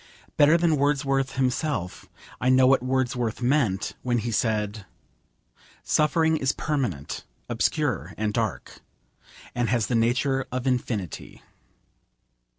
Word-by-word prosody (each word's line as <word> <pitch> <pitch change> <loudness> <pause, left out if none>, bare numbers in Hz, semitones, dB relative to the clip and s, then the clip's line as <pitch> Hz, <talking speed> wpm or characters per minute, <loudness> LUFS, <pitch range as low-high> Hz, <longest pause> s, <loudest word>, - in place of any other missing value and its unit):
Better 150 +3 +5
than 170 -3 +2
Wordsworth 135 -1 +1
himself 130 - -2 0.3
I 125 - +1
know 130 0 +5
what 130 0 +4
Wordsworth 125 -3 -1
meant 120 -7 +1
when 120 -1 0
he 115 +1 -2
said 105 -2 -1 1.0
'Suffering 160 +1 +2
is 135 -2 0
permanent, 120 - -3 0.2
obscure, - - -1
and 105 -1 -1
dark 110 -4 -3 0.7
And 120 -1 -1
has 120 -3 +1
the - - -3
nature 130 +4 +1
of 130 0 -3
infinity.' 120 - -3
125 Hz, 115 wpm, -25 LUFS, 115-135 Hz, 1.0 s, Better